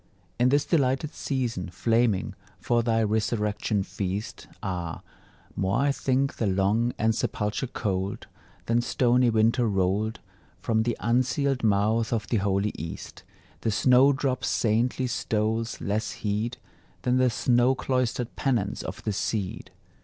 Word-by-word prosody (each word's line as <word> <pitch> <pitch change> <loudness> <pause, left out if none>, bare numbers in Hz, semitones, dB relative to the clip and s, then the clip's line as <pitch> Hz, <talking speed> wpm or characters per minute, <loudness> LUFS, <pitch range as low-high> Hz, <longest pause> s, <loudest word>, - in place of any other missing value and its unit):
In 125 +1 +4
this 145 +2 +2
delighted 145 -1 +1
season, 120 - -2
flaming 115 +2 +1 0.3
For 120 -1 +1
thy 115 -1 +1
resurrection 105 -1 0
feast, 100 +1 -4 0.2
Ah, 85 -3 -4 0.5
more 95 0 0
I 140 0 +3
think 135 0 0
the 110 - 0
long 100 +5 +2
ensepulture 110 +1 -1
cold, 100 -5 -3 0.4
Than 115 +1 +2
stony 125 0 +3
winter 115 +2 +3
rolled 100 +3 0 0.4
From 110 -1 +1
the 120 +1 -1
unsealed 130 +3 +1
mouth 110 +2 +2
of 110 -3 0
the 115 - +2
holy 100 +1 +1
East; 80 +2 -7 0.4
The - - -1
snowdrop's 130 +4 +3
saintly 120 +4 +1
stoles 110 -1 -1
less 105 +2 -2
heed 110 +4 -2 0.5
Than 125 0 +2
the 130 0 +4
snow 120 +2 +2
cloistered 125 -2 -1
penance 115 -7 0
of 95 - -7
the 105 - -1
seed. 100 -1 -3
115 Hz, 130 wpm, -26 LUFS, 105-125 Hz, 0.5 s, In